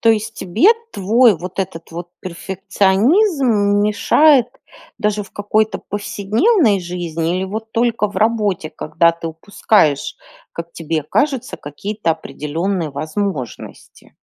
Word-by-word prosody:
То 230 Hz, -, +2 dB
есть 220 Hz, 0 st, +2 dB
тебе 210 Hz, -, +2 dB, 0.2 s
твой, 220 Hz, +2 st, +4 dB
вот 180 Hz, +3 st, -8 dB
этот 170 Hz, -4 st, -4 dB
вот 175 Hz, +1 st, -7 dB
перфекционизм, 200 Hz, -, +1 dB, 0.4 s
мешает 250 Hz, +6 st, +4 dB, 0.5 s
даже 210 Hz, 0 st, -1 dB
в 200 Hz, -, -14 dB
какой-то 215 Hz, +1 st, 0 dB
повседневной 210 Hz, -, +1 dB
жизни? 175 Hz, -1 st, -3 dB
Или, 185 Hz, -, -1 dB
вот, 220 Hz, +3 st, -6 dB
только 230 Hz, -2 st, +1 dB
в -, -, -11 dB
работе, 210 Hz, -7 st, 0 dB
когда 165 Hz, +2 st, +1 dB
ты 165 Hz, 0 st, -7 dB
упускаешь, 160 Hz, -3 st, +1 dB, 0.4 s
как 170 Hz, 0 st, -7 dB
тебе 160 Hz, -2 st, -3 dB
кажется, 275 Hz, -, -1 dB
какие-то 170 Hz, +5 st, -3 dB
определенные 160 Hz, +5 st, -3 dB
возможности? 155 Hz, -, -6 dB
200 Hz, 120 wpm, -18 LUFS, 170-220 Hz, 0.5 s, твой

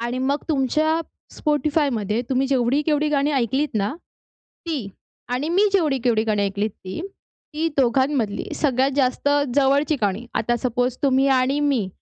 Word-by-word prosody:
आणि 240 Hz, +2 st, -3 dB
मग 275 Hz, +3 st, 0 dB
तुमच्या 310 Hz, +3 st, +1 dB, 0.3 s
Spotifyमध्ये, 285 Hz, -, 0 dB
तुम्ही 265 Hz, +1 st, +1 dB
जेवढी-केवढी 285 Hz, +4 st, +1 dB
गाणी 290 Hz, 0 st, +1 dB
ऐकलीत 270 Hz, +3 st, 0 dB
ना, 205 Hz, +5 st, 0 dB, 0.7 s
ती 280 Hz, -11 st, -3 dB, 0.5 s
आणि 285 Hz, +5 st, -2 dB
मी 370 Hz, +4 st, +3 dB
जेवढी-केवढी 265 Hz, -, +2 dB
गाणी 210 Hz, -2 st, 0 dB
ऐकलीत, 200 Hz, +2 st, -1 dB
ती. 190 Hz, +3 st, -8 dB, 0.5 s
ती 325 Hz, +2 st, 0 dB
दोघांमधली 260 Hz, -4 st, +1 dB
सगळ्यात 270 Hz, -2 st, +1 dB
जास्त 265 Hz, +1 st, +1 dB, 0.3 s
जवळची 285 Hz, +2 st, +3 dB
गाणी, 205 Hz, +4 st, -1 dB
आता 240 Hz, +2 st, 0 dB
सपोज 250 Hz, 0 st, 0 dB
तुम्ही 270 Hz, 0 st, +3 dB
आणि 275 Hz, +3 st, 0 dB
मी 270 Hz, -9 st, +1 dB
265 Hz, 135 wpm, -22 LUFS, 235-290 Hz, 0.7 s, मी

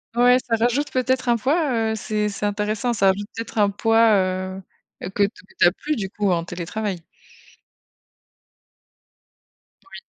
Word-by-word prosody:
Ouais, 245 Hz, +1 st, +5 dB
ça 230 Hz, -, +2 dB
rajoute 275 Hz, +4 st, 0 dB
peut-être 260 Hz, 0 st, 0 dB
un 240 Hz, -1 st, +3 dB
poids, 285 Hz, +4 st, +1 dB, 0.2 s
heu, -, -, -1 dB
c'est 210 Hz, 0 st, -2 dB
c'est 205 Hz, 0 st, -4 dB
intéressant, 210 Hz, +3 st, -1 dB
ça 200 Hz, -3 st, +2 dB
rajoute 200 Hz, +2 st, +1 dB
peut-être 230 Hz, 0 st, -7 dB
un 205 Hz, -1 st, +3 dB
poids, 225 Hz, +2 st, +3 dB
heu, 185 Hz, 0 st, -1 dB, 0.4 s
heu, 175 Hz, -, -5 dB
que 200 Hz, +2 st, +1 dB
t 200 Hz, -, +2 dB, 0.3 s
tu -, -, +6 dB
as 175 Hz, -, +6 dB
plus, 300 Hz, +10 st, -3 dB
du 200 Hz, -7 st, -3 dB
coup, 205 Hz, -1 st, -1 dB
en 170 Hz, -1 st, 0 dB
télétravail. 180 Hz, +1 st, -4 dB, 2.9 s
Oui. -, -, -9 dB
210 Hz, 160 wpm, -22 LUFS, 195-240 Hz, 2.9 s, tu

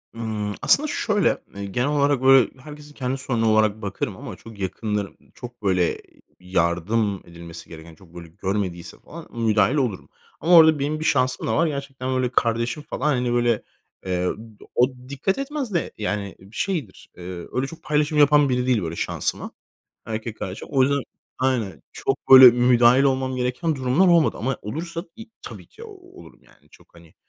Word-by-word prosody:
Imm, 110 Hz, -3 st, -4 dB
aslında 305 Hz, +2 st, +4 dB
şöyle, 215 Hz, -, +1 dB, 0.2 s
eee, 100 Hz, 0 st, -5 dB
genel 120 Hz, +7 st, -1 dB
olarak 145 Hz, -2 st, +1 dB
böyle 135 Hz, -2 st, +6 dB
herkesin 150 Hz, +1 st, -12 dB
kendi 130 Hz, -1 st, -3 dB
sorunu 120 Hz, -4 st, 0 dB
olarak 110 Hz, 0 st, +2 dB
bakarım 100 Hz, -2 st, -4 dB
ama -, -, -8 dB
çok 115 Hz, -3 st, -14 dB
yakınlarım 100 Hz, +1 st, -3 dB, 0.2 s
çok 120 Hz, -3 st, -11 dB
böyle, 90 Hz, -3 st, +1 dB
eee, -, -, -22 dB, 0.2 s
yardım 90 Hz, +4 st, 0 dB
edilmesi 85 Hz, -1 st, -11 dB
gereken 80 Hz, 0 st, -12 dB
çok 85 Hz, 0 st, -20 dB
böyle 85 Hz, -1 st, -9 dB
görmediyse 90 Hz, -1 st, -4 dB
falan 165 Hz, 0 st, -12 dB
müdahil 110 Hz, +2 st, +2 dB
olurum. 125 Hz, -10 st, -2 dB, 0.3 s
Ama 175 Hz, +1 st, +4 dB
orada 160 Hz, -2 st, +7 dB
benim 150 Hz, +2 st, -2 dB
bir 155 Hz, -, -4 dB
şansım 130 Hz, -1 st, +1 dB
da 110 Hz, -, 0 dB
var. 170 Hz, -, +3 dB
Gerçekten 135 Hz, -3 st, -4 dB
böyle 130 Hz, -1 st, 0 dB
kardeşim 115 Hz, +4 st, -1 dB
falan, -, -, -7 dB
hani, 125 Hz, -1 st, -1 dB
böyle, 120 Hz, -2 st, +1 dB, 0.4 s
eee, 90 Hz, -1 st, -1 dB
ı -, -, -1 dB, 0.4 s
o 125 Hz, -, +4 dB, 0.2 s
dikkat 165 Hz, -, -1 dB
etmez 275 Hz, -5 st, -4 dB
de 170 Hz, -, -1 dB
yani 105 Hz, -2 st, -3 dB
b 95 Hz, -, -17 dB
şeydir. 155 Hz, -, -4 dB
Eee, 90 Hz, -, -10 dB, 0.3 s
öyle 130 Hz, +1 st, -1 dB
çok 165 Hz, -, -12 dB
paylaşım 150 Hz, 0 st, 0 dB
yapan 145 Hz, -1 st, +5 dB
biri 125 Hz, 0 st, 0 dB
değil 120 Hz, -5 st, +2 dB
böyle 85 Hz, 0 st, -4 dB
şansıma, -, -, -3 dB, 0.6 s
erkek 110 Hz, 0 st, -5 dB
kardeşim. 95 Hz, +1 st, -6 dB
O 135 Hz, -2 st, +3 dB
yüzden 140 Hz, +1 st, +2 dB, 0.4 s
aynen, 125 Hz, -9 st, -1 dB
çok -, -, -3 dB
böyle 130 Hz, -2 st, +11 dB
müdahil 125 Hz, +1 st, +4 dB
olmam 130 Hz, -1 st, 0 dB
gereken 125 Hz, +5 st, -1 dB
durumlar 130 Hz, +8 st, +2 dB
olmadı 170 Hz, -3 st, +3 dB
ama 135 Hz, +4 st, -2 dB
olursa, 165 Hz, -, -5 dB
iii, 225 Hz, 0 st, -11 dB
tabii -, -, -10 dB
ki 460 Hz, -, -16 dB
olurum 380 Hz, -3 st, -15 dB
yani. -, -, -26 dB
Çok -, -, -22 dB
hani, -, -, -18 dB
125 Hz, 175 wpm, -23 LUFS, 105-145 Hz, 0.6 s, böyle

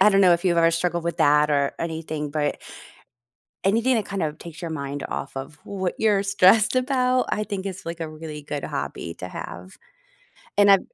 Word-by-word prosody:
I -, -, +8 dB
don't 195 Hz, 0 st, +4 dB
know 180 Hz, -2 st, +7 dB
if 170 Hz, -, -4 dB
you've 175 Hz, -2 st, +3 dB
ever 165 Hz, 0 st, +5 dB
struggled 170 Hz, 0 st, 0 dB
with 170 Hz, -, -2 dB
that 150 Hz, +1 st, +4 dB
or 140 Hz, -1 st, +2 dB
anything, 160 Hz, -2 st, -3 dB
but 145 Hz, -1 st, -1 dB, 1.1 s
anything 230 Hz, +5 st, +3 dB
that 215 Hz, -, -1 dB
kinda 180 Hz, -6 st, -1 dB
takes 170 Hz, -1 st, -10 dB
your 170 Hz, -, -4 dB
mind 140 Hz, -2 st, -4 dB
off 135 Hz, -, -5 dB
of 135 Hz, +3 st, -6 dB
what 190 Hz, -3 st, -3 dB
you're 210 Hz, -3 st, +3 dB
stressed 200 Hz, +4 st, +4 dB
about, 255 Hz, -1 st, +2 dB
I 210 Hz, -, 0 dB
think 200 Hz, -2 st, -4 dB
is, 190 Hz, -1 st, -6 dB
like, 170 Hz, 0 st, -5 dB
a 165 Hz, -, -3 dB
really 155 Hz, -1 st, -8 dB
good 145 Hz, -1 st, -4 dB
hobby 85 Hz, -1 st, -4 dB
to 90 Hz, -, -5 dB
have. 90 Hz, +1 st, -8 dB, 0.8 s
And 205 Hz, 0 st, +6 dB
I've 195 Hz, -, +7 dB
170 Hz, 200 wpm, -24 LUFS, 150-200 Hz, 1.1 s, I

